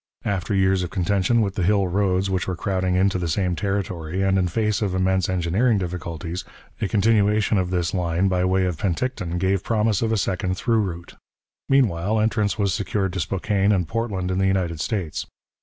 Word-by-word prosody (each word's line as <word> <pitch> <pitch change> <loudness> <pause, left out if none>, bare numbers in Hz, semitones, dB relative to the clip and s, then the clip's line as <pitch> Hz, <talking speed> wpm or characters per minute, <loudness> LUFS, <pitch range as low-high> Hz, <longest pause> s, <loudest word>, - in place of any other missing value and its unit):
After 100 0 -1
years 95 -1 +3
of 90 - -3
contention 100 +5 +1
with 100 -3 0
the 100 - -3
Hill 100 +1 +2
roads 95 0 +1
which 95 -2 -1
were 95 - -1
crowding 95 0 -1
into 95 0 +2
the 85 - -2
same 90 +2 0
territory, 95 -3 -2
and 95 0 +2
in 90 - +1
face 105 +3 0
of 100 -3 -1
immense 95 0 +1
engineering 95 +6 +1
difficulties, 90 -1 -4 0.4
a 105 - +1
continuation 105 0 +2
of 90 -1 -1
this 90 -2 -1
line 90 0 +1
by 90 -1 +1
way 95 0 +2
of 90 -4 -2
Penticton 95 -2 -2
gave 95 +1 0
promise 110 -3 +1
of 115 -1 0
a 110 - +2
second 95 -1 -1
through 115 +1 +1
route. 85 -4 -6 0.5
Meanwhile, 110 -6 +2
entrance 110 -1 +1
was 100 -2 +1
secured 100 -2 -1
to 95 - -3
Spokane 100 +4 0
and 90 -5 +1
Portland 100 -4 -2
in 95 - 0
the 95 - +2
United 90 -4 0
States. 90 -3 -3
95 Hz, 190 wpm, -23 LUFS, 90-105 Hz, 0.5 s, years